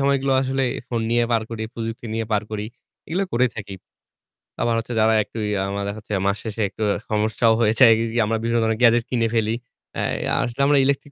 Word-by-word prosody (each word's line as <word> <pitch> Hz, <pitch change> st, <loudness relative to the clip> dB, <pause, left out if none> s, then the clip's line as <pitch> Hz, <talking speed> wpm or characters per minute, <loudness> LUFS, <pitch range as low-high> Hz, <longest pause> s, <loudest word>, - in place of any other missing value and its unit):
সময়গুলো 140 Hz, -1 st, +2 dB
আসলে 135 Hz, +1 st, -1 dB, 0.3 s
ফোন 120 Hz, -2 st, -1 dB
নিয়ে 120 Hz, 0 st, +3 dB
পার 115 Hz, -1 st, +2 dB
করি, 115 Hz, -1 st, -4 dB
প্রযুক্তি 115 Hz, 0 st, -5 dB
নিয়ে 115 Hz, 0 st, -2 dB
পার 105 Hz, 0 st, +2 dB
করি। 105 Hz, -1 st, -3 dB, 0.4 s
এগুলো 185 Hz, +5 st, 0 dB
করে 125 Hz, +2 st, +3 dB
থাকি। 100 Hz, -2 st, -6 dB, 0.9 s
আবার 120 Hz, 0 st, +2 dB
হচ্ছে 115 Hz, +2 st, -5 dB
যারা 110 Hz, +1 st, +4 dB
একটু 115 Hz, -, -12 dB
ইয়ে 105 Hz, -, 0 dB
আমরা 100 Hz, +1 st, -3 dB
দেখা 100 Hz, +1 st, -4 dB
যাচ্ছে 105 Hz, -, -7 dB
মাস 100 Hz, +1 st, +1 dB
শেষে 110 Hz, 0 st, -4 dB
একটু 110 Hz, -, -5 dB, 0.3 s
সমস্যাও 110 Hz, +1 st, +2 dB
হয়েছে 115 Hz, +3 st, +4 dB
একদিক 115 Hz, +1 st, +2 dB
দিয়ে 115 Hz, 0 st, +2 dB
আমরা 115 Hz, +1 st, 0 dB
বিভিন্ন 115 Hz, +1 st, +1 dB
ধরনের 110 Hz, 0 st, 0 dB
গ্যাজেট 120 Hz, -1 st, +5 dB
কিনে 115 Hz, -2 st, +1 dB
ফেলি। 110 Hz, 0 st, +1 dB, 0.4 s
অ্যা -, -, -2 dB
আসলে 120 Hz, +1 st, -3 dB
আমরা 145 Hz, -, +4 dB
ইলেকট্রিক 140 Hz, +1 st, -1 dB
115 Hz, 205 wpm, -22 LUFS, 110-120 Hz, 0.9 s, গ্যাজেট